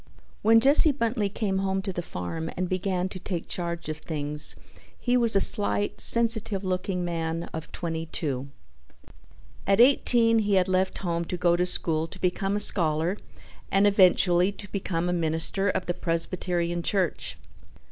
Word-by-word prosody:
When 225 +1 +5
Jesse 285 +5 +4
Bentley 230 -5 -1
came 195 -2 -2
home 190 0 -2
to 195 -2 -4
the 175 - -3
farm 160 - -6
and 185 0 -1
began 185 0 -2
to 185 - -7
take 180 -2 -5
charge 170 -2 -4
of 155 -1 -4
things 150 -1 0 0.4
he 245 0 0
was 235 -4 +3
a - - +5
slight, 205 0 +2
sensitive 225 -4 +1
looking 185 -1 -2
man 165 -1 -3
of 160 0 -7
twenty 165 -1 -5
two. 140 -5 -3 1.2
At 195 +1 +2
eighteen 235 -3 +4
he 205 -2 +1
had 185 -1 +2
left 185 0 0
home 170 -2 -2
to 180 - -5
go 175 0 +2
to 180 +1 0
school 160 -2 +1
to - - -10
become 195 +2 -1
a - - -1
scholar 165 -2 +3 0.5
and 195 +1 +3
eventually 185 -2 +4
to 205 0 -10
become 180 -3 -2
a 180 - 0
minister 165 +4 0
of 190 -1 -2
the 175 - -2
Presbyterian 175 0 0
Church. 185 -2 -1
185 Hz, 165 wpm, -26 LUFS, 170-200 Hz, 1.2 s, When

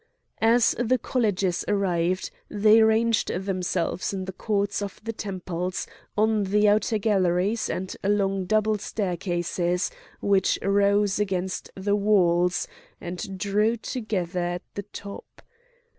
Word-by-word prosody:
As 230 +1 +5
the 245 +1 +2
colleges 205 -7 0
arrived 185 -3 0 0.2
they 215 +2 +5
ranged 220 +1 +3
themselves 185 -2 -2
in 190 -1 -4
the 190 - -5
courts 200 0 -1
of 200 -1 -5
the 225 +1 -4
temples, 185 -3 -4 0.3
on 215 -1 +2
the 210 +2 +3
outer 215 +1 +3
galleries, 200 0 +1
and 185 0 -3
along 195 -1 +1
double 215 +2 +1
staircases 180 -2 -1 0.3
which 200 -1 +2
rose 200 0 +2
against 190 -2 -2
the 200 +1 0
walls, 180 -4 +2 0.3
and 180 +2 -6
drew 210 +4 +1
together 200 -7 -3
at 175 0 -2
the 200 - -5
top. 200 0 -10
200 Hz, 120 wpm, -25 LUFS, 180-210 Hz, 0.3 s, As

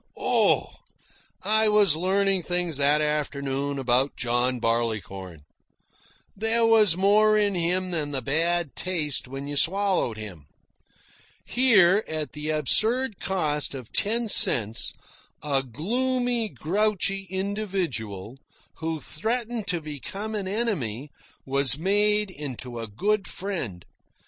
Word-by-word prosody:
Oh! - - +1 0.7
I 220 0 +3
was 205 -6 +5
learning 190 +2 +1
things 175 -3 -1
that 145 +2 +3
afternoon 140 -2 -2
about 130 +1 +1
John 120 +1 0
Barleycorn. 100 -8 -3 0.9
There 225 +3 +1
was 215 -6 +5
more 215 +2 +4
in 205 -1 +2
him 180 +1 0
than 155 -4 -2
the 135 -3 -4
bad 165 +3 0
taste 155 -8 -1
when 135 +2 -7
you 145 - -4
swallowed 185 - +1
him. 90 -9 -9 1.0
Here, 210 -6 +4
at 155 -1 -4
the 150 +1 -5
absurd 220 - +2
cost 150 -7 -2
of 125 -4 -10
ten 230 +3 0
cents, 115 - +4 0.5
a 140 -2 0
gloomy, 240 - -2
grouchy 195 +2 -1
individual, 180 - -4 0.4
who 160 -1 -4
threatened 225 +6 -3
to 175 -4 -1
become 175 +9 -7
an 205 -3 -3
enemy, 150 - -3 0.3
was 135 0 +4
made 205 +3 +1
into 130 -6 -7
a 115 - -5
good 195 - -1
friend. 150 - -5
170 Hz, 115 wpm, -25 LUFS, 135-205 Hz, 1.0 s, was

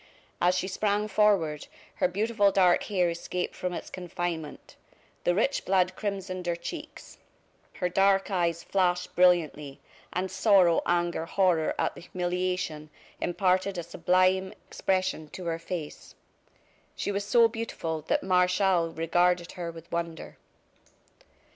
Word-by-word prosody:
As 180 +1 +3
she 185 - -1
sprang 205 +2 0
forward 195 -8 +2 0.3
her - - +3
beautiful 205 +2 +2
dark 185 -2 +3
hair 180 -5 +1
escaped 175 +1 -4
from 180 - -3
its - - -6
confinement, 175 -3 -5 0.5
the 175 - +3
rich 245 +8 +1
blood 185 -1 +2
crimsoned 190 -3 -4
her 170 - +1
cheeks, 300 - -9 0.5
her 180 - -1
dark 195 +2 +2
eyes 170 -2 0
flashed 180 -2 0
brilliantly, 160 -6 +2 0.3
and 185 +1 -2
sorrow, 190 -3 +4
anger, 175 -1 0
horror 175 -5 +2
at - - 0
the - - -12
humiliation, 180 -3 -3 0.3
imparted 185 +1 +1
a 175 - -3
sublime 185 +3 +1
expression 185 -5 -1
to 180 - -8
her 165 -1 -2
face. 165 -3 -7 0.8
She - - -2
was 200 0 -2
so 230 +3 +5
beautiful 215 -8 -4
that - - +1
Martial 180 -2 +2
regarded 175 +2 +1
her 175 -2 -5
with 165 0 -11
wonder. 170 -1 -4
180 Hz, 130 wpm, -28 LUFS, 170-190 Hz, 0.8 s, so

